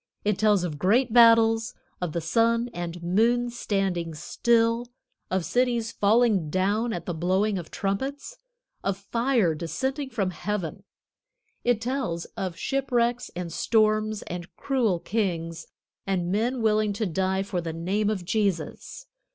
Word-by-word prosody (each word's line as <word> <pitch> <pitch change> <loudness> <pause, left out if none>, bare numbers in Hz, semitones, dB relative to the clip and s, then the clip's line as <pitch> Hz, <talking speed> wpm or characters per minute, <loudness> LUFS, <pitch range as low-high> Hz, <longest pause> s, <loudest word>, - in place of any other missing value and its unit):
It 205 -2 +1
tells 210 -3 +3
of 155 -5 -4
great 225 - +2
battles, 230 -1 +5 0.3
of 175 -4 -2
the 170 - -1
sun 230 +7 +1
and 175 -1 -5
moon 235 +7 +2
standing 190 -8 -2
still, 230 +7 +1 0.4
of 185 -2 0
cities 240 -2 +1
falling 210 -5 +3
down 205 +7 +1
at 175 - -4
the 175 - -3
blowing 190 +5 +1
of 170 - -9
trumpets; 270 - -3 0.4
of 195 -1 -1
fire 230 -2 +1
descending 265 - -3
from 200 -7 -1
heaven; 185 -1 -4 0.8
it 240 -3 +2
tells 235 -8 -2
of 185 -3 -4
shipwrecks 240 -1 0
and 175 -2 -5
storms, 215 -1 +1
and 175 0 -7
cruel 235 -10 0
kings, 165 -6 -2 0.4
and 180 -2 0
men 235 +4 0
willing 215 -1 +2
to 215 +2 -2
die 190 +1 0
for 190 -3 -3
the 165 -1 -4
name 190 +6 -1
of 195 -5 -2
Jesus. 200 - -2
210 Hz, 140 wpm, -26 LUFS, 180-235 Hz, 0.8 s, battles